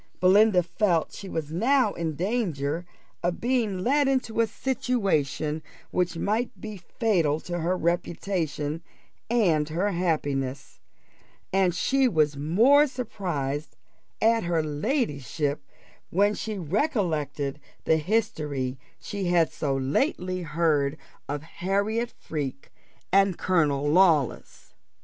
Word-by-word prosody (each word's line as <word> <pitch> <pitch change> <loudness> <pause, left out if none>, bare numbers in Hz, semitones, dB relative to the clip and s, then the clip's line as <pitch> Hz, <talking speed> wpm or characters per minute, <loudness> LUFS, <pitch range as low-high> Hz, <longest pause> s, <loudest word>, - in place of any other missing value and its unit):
Belinda 190 0 +5
felt 175 -2 +1
she 195 - -8
was 155 -3 -4
now 235 - +2
in 160 -2 -3
danger 175 - -1 0.3
of 175 0 -1
being 230 -7 0
led 285 +4 +3
into 255 -4 +1
a 230 - +2
situation 195 - -1 0.3
which 175 -2 0
might 220 +7 -1
be 215 -1 -6
fatal 175 - 0
to 175 -1 -4
her 175 +3 0
reputation 170 -3 -1 0.5
and 170 -11 +2
her 180 +6 0
happiness; 140 -6 -2 0.7
and 190 -3 +3
she 270 +8 +2
was 155 -9 +3
the 140 - -9
more 235 - +5
surprised 155 - -4 0.4
at 225 +1 +3
her 170 -2 0
ladyship, 150 - -1 0.5
when 205 +3 +3
she 215 0 -4
recollected 160 - -1 0.3
the 160 - +4
history 150 - -1 0.2
she 200 -2 -4
had 175 -2 +3
so 140 -3 -1
lately 180 - 0
heard 155 -3 +1 0.3
of 145 0 -3
Harriot 200 +7 -1
Freke 140 -3 -5 0.4
and 195 -2 +4
Colonel 145 -6 +1
Lawless. 160 -5 +2
175 Hz, 115 wpm, -26 LUFS, 150-210 Hz, 0.7 s, Belinda